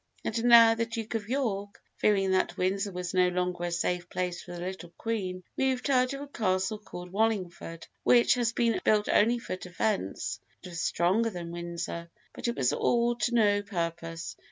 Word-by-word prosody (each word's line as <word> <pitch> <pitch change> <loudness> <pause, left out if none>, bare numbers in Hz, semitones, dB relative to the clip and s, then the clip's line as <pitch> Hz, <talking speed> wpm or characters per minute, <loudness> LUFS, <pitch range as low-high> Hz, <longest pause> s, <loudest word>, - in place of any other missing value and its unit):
And 230 +1 -1
now 230 -1 +8
the 230 0 -1
Duke 225 -1 -5
of 220 -2 -3
York, 205 -7 -2 0.2
fearing 195 -2 +2
that 185 - +1
Windsor 195 +2 0
was 180 0 -4
no 180 -1 +4
longer 180 -1 -1
a 175 - -2
safe 175 +1 -1
place 180 -1 -3
for 175 - -10
the 175 - -6
little 180 -1 -6
Queen, 185 -5 -3
moved 265 0 0
her 255 -2 +4
to 275 +2 -5
a - - -9
castle 190 -4 -1
called 180 -4 -9
Wallingford, 185 -6 -1 0.2
which 240 -1 +5
had 240 -2 +1
been 235 -2 +1
built 210 -1 +3
only 235 +3 +4
for 230 -5 -5
defence, 180 - -2 0.2
and 180 - -8
was 170 -1 -4
stronger 195 +7 +2
than 175 -4 -6
Windsor. 170 0 -5 0.2
But - - -4
it 235 - -1
was 125 -2 +1
all 240 0 +2
to 240 0 0
no 205 -3 +4
purpose. 170 -4 -4
195 Hz, 185 wpm, -29 LUFS, 175-230 Hz, 0.2 s, now